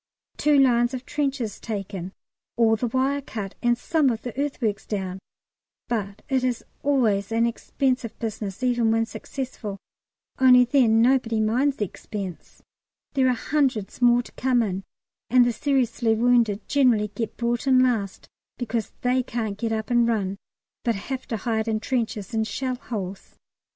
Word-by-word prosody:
Two 295 Hz, -1 st, +3 dB
lines 245 Hz, -2 st, +4 dB
of 255 Hz, 0 st, -7 dB
trenches 270 Hz, -7 st, -2 dB
taken, 195 Hz, -4 st, -5 dB, 0.5 s
all 225 Hz, -1 st, +4 dB
the 240 Hz, +3 st, -1 dB
wire 265 Hz, +4 st, 0 dB
cut, 210 Hz, -7 st, -6 dB
and 240 Hz, -1 st, +2 dB
some 305 Hz, +2 st, +2 dB
of 225 Hz, -2 st, -3 dB
the 245 Hz, -, -6 dB
earthworks 245 Hz, -7 st, -2 dB
down; 190 Hz, -3 st, -3 dB, 0.7 s
but 205 Hz, -4 st, -3 dB
it 265 Hz, -3 st, +1 dB
is 250 Hz, -2 st, -1 dB, 0.2 s
always 225 Hz, -8 st, +1 dB
an 230 Hz, +1 st, +3 dB
expensive 250 Hz, +1 st, -1 dB
business 215 Hz, -1 st, -5 dB
even 240 Hz, -2 st, +2 dB
when 225 Hz, 0 st, +2 dB
successful 225 Hz, -2 st, -6 dB, 0.6 s
only 250 Hz, -1 st, +7 dB
then 235 Hz, -3 st, +4 dB
nobody 240 Hz, -3 st, +2 dB
minds 250 Hz, +6 st, +2 dB
the 210 Hz, -, 0 dB
expense. 195 Hz, -2 st, -8 dB, 0.5 s
There 265 Hz, -2 st, +3 dB
are 250 Hz, -, +2 dB
hundreds 255 Hz, -6 st, -1 dB
more 240 Hz, 0 st, +5 dB
to -, -, -14 dB
come 250 Hz, -2 st, +1 dB
in, 195 Hz, -2 st, -3 dB, 0.5 s
and 250 Hz, 0 st, +6 dB
the 240 Hz, -, +1 dB
seriously 245 Hz, -3 st, +1 dB
wounded 230 Hz, -3 st, +2 dB
generally 240 Hz, -7 st, +3 dB
get 225 Hz, +1 st, -5 dB
brought 240 Hz, +3 st, -1 dB
in 255 Hz, -1 st, +6 dB
last, 220 Hz, -6 st, -1 dB, 0.3 s
because 230 Hz, -3 st, -3 dB
they 250 Hz, +1 st, +2 dB
can't 225 Hz, -4 st, -3 dB
get 225 Hz, +2 st, -2 dB
up 220 Hz, +2 st, -2 dB
and 240 Hz, -1 st, +4 dB
run, 200 Hz, -4 st, -1 dB, 0.5 s
but 235 Hz, -2 st, +1 dB
have 260 Hz, +6 st, -5 dB
to 230 Hz, -, -2 dB
hide 220 Hz, 0 st, -1 dB
in 220 Hz, -1 st, 0 dB
trenches 230 Hz, -2 st, -2 dB
and 220 Hz, 0 st, 0 dB
shell 260 Hz, +1 st, -2 dB
holes. 205 Hz, -7 st, -6 dB
235 Hz, 160 wpm, -24 LUFS, 215-255 Hz, 0.7 s, only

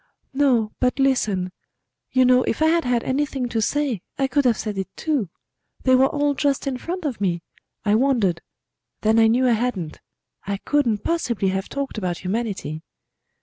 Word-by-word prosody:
"No; 255 Hz, -6 st, +2 dB
but 250 Hz, +1 st, +1 dB
listen.... 215 Hz, -9 st, +1 dB, 0.6 s
You 255 Hz, -1 st, +4 dB
know, 250 Hz, 0 st, +5 dB
if 255 Hz, -, 0 dB
I -, -, +5 dB
had 335 Hz, +1 st, +3 dB
had 245 Hz, -1 st, +1 dB
anything 270 Hz, -1 st, -1 dB
to 225 Hz, -2 st, -1 dB
say 270 Hz, -4 st, 0 dB, 0.2 s
I 275 Hz, -, +2 dB
could 270 Hz, +1 st, +1 dB
have 240 Hz, -3 st, +3 dB
said 210 Hz, -3 st, -4 dB
it 190 Hz, -, -2 dB
too. 285 Hz, -, -1 dB, 0.5 s
They 260 Hz, -, +4 dB
were 260 Hz, +1 st, +6 dB
all 290 Hz, 0 st, 0 dB
just 280 Hz, -1 st, 0 dB
in 265 Hz, -2 st, -2 dB
front 355 Hz, +3 st, -5 dB
of 255 Hz, -8 st, -3 dB
me: 175 Hz, -3 st, 0 dB, 0.4 s
I 205 Hz, -, +3 dB
wondered; 220 Hz, -8 st, +2 dB, 0.6 s
then 220 Hz, +1 st, +3 dB
I 225 Hz, -, +6 dB
knew 250 Hz, +3 st, +3 dB
I -, -, +4 dB
hadn't. 215 Hz, -9 st, -2 dB, 0.5 s
I 200 Hz, 0 st, -1 dB
couldn't 235 Hz, -4 st, 0 dB
possibly 240 Hz, -, 0 dB
have 190 Hz, +1 st, -2 dB
talked 275 Hz, -5 st, -4 dB
about 180 Hz, -3 st, -2 dB
Humanity." 190 Hz, -6 st, -3 dB
245 Hz, 180 wpm, -23 LUFS, 205-275 Hz, 0.6 s, were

